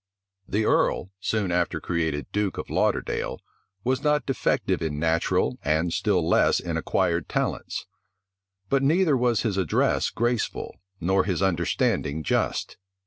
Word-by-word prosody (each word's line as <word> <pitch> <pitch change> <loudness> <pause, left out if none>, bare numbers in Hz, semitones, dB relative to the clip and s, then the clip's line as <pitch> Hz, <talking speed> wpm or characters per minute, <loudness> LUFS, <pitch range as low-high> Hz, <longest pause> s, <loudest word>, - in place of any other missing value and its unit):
The 105 +2 0
earl, 95 - +1
soon 105 -2 -1
after 85 0 0
created 80 -5 -1
duke 105 -4 -1
of - - -6
Lauderdale, - - 0 0.4
was 130 +1 0
not 150 0 +2
defective 135 - 0
in 80 -3 -2
natural, 80 +1 +1
and 80 +3 +1
still 90 -6 +1
less - - +4
in - - -4
acquired 85 -1 0
talents; - - -2 0.8
but 135 +6 +2
neither 155 +2 +3
was 120 -5 +2
his 105 -4 -1
address 90 -6 +1
graceful, 120 -1 -2 0.2
nor 95 +2 +2
his 95 -2 0
understanding 85 -4 0
just. - - -1
95 Hz, 135 wpm, -25 LUFS, 85-120 Hz, 0.8 s, less